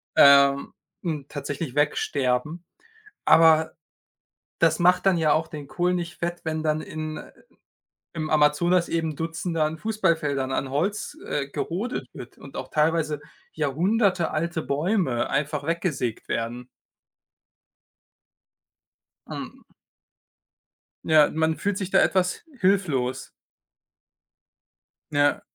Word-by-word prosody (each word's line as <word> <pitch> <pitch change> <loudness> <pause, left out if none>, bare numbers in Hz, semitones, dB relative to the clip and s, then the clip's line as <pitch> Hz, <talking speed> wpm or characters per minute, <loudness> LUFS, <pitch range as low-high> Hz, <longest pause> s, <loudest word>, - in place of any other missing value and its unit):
ähm, 140 0 +6 0.3
n 155 -5 -3
tatsächlich 145 -1 -5
wegsterben. 145 +1 0 0.6
Aber 160 -1 +5 0.8
das 160 -1 +3
macht 180 +2 +3
dann 190 -2 +4
ja 160 -2 +2
auch 160 +1 0
den 150 -3 -8
Kohl 180 +4 0
nicht 175 -2 -3
fett, 175 0 -3
wenn 160 -1 -2
dann 155 0 0
in 155 0 -6 0.9
im 155 -2 -4
Amazonas 155 +4 +3
eben 160 -2 -1
Dutzende 165 +1 -2
an 155 +1 -2
Fußballfeldern, 160 -10 0
an 130 0 -2
Holz, 200 - -2
äh, 140 -2 -2
gerodet 175 - -4
wird 120 - -11
und 140 - -12
auch 130 - -5
teilweise 155 -1 +1 0.3
jahrhundertealte 170 - 0
Bäume 145 - 0
einfach 145 +1 -1
weggesägt 160 - -2
werden. 120 +2 -3 2.6
Ähm - - -8 1.4
Ja, 155 -2 +5
man 160 0 0
fühlt 200 -1 -1
sich 190 -3 -4
da - - +5
etwas 180 -1 +1 0.2
hilflos. 155 - 0 1.8
Ja. 145 +7 +2
155 Hz, 105 wpm, -25 LUFS, 145-175 Hz, 2.6 s, ähm